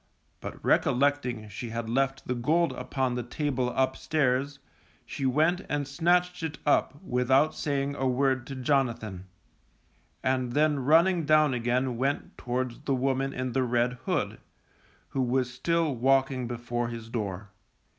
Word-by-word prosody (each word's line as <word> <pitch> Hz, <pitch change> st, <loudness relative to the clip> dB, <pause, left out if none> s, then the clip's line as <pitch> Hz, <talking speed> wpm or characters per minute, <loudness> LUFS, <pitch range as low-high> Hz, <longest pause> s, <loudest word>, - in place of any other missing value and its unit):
But -, -, -8 dB
recollecting 125 Hz, -4 st, +2 dB
she 115 Hz, +3 st, -6 dB
had 115 Hz, 0 st, -4 dB
left 135 Hz, +3 st, 0 dB
the 125 Hz, -, 0 dB
gold 155 Hz, +8 st, +1 dB
upon 130 Hz, -2 st, -2 dB
the 125 Hz, -, -2 dB
table 130 Hz, 0 st, -1 dB
upstairs, 130 Hz, +1 st, 0 dB, 0.5 s
she 135 Hz, -, -2 dB
went 160 Hz, +7 st, +2 dB
and 145 Hz, -1 st, -1 dB
snatched 175 Hz, +4 st, +1 dB
it 160 Hz, -3 st, -4 dB
up 145 Hz, 0 st, +2 dB
without 130 Hz, +1 st, +2 dB
saying 140 Hz, -1 st, -1 dB
a 135 Hz, -2 st, -1 dB
word 130 Hz, 0 st, +1 dB
to 135 Hz, -, -6 dB
Jonathan, 120 Hz, -8 st, -1 dB, 1.0 s
and 130 Hz, -2 st, 0 dB
then 150 Hz, 0 st, +2 dB
running 165 Hz, +6 st, +4 dB
down 155 Hz, -2 st, +4 dB
again 125 Hz, +1 st, 0 dB
went 135 Hz, +3 st, -2 dB
towards 125 Hz, 0 st, -3 dB
the 140 Hz, -2 st, -1 dB
woman 135 Hz, +1 st, 0 dB
in 130 Hz, -1 st, -3 dB
the 130 Hz, -, +1 dB
red 120 Hz, 0 st, +1 dB
hood, -, -, -1 dB, 0.7 s
who 135 Hz, -, -1 dB
was 125 Hz, 0 st, 0 dB
still 165 Hz, +3 st, 0 dB
walking 130 Hz, 0 st, +2 dB
before 120 Hz, 0 st, -3 dB
his 115 Hz, -1 st, -7 dB
door. 100 Hz, -4 st, -4 dB
130 Hz, 145 wpm, -28 LUFS, 125-145 Hz, 1.0 s, running